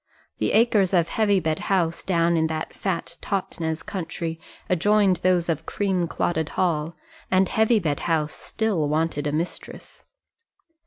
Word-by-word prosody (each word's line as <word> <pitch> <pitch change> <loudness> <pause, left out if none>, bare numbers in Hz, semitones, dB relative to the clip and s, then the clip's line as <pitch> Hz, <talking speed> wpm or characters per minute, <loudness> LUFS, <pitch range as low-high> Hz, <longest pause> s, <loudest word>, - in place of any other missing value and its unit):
The - - 0
acres 210 -5 +4
of 170 -2 +2
Heavybed 190 -8 +1
House, 170 -4 0
down 170 -2 +2
in 160 -1 +2
that 160 0 -4
fat 170 -3 -3
Totnes 165 -4 -3
country, 165 -4 -4 0.3
adjoined 195 +1 +3
those 180 -2 +2
of 160 -1 -2
Creamclotted 175 -4 -1
Hall, 165 -3 0 0.3
and 190 0 +3
Heavybed 215 - +2
House 155 -3 0
still 200 -10 -1
wanted 155 -1 0
a - - 0
mistress. 165 +4 -5
170 Hz, 125 wpm, -24 LUFS, 160-195 Hz, 0.3 s, acres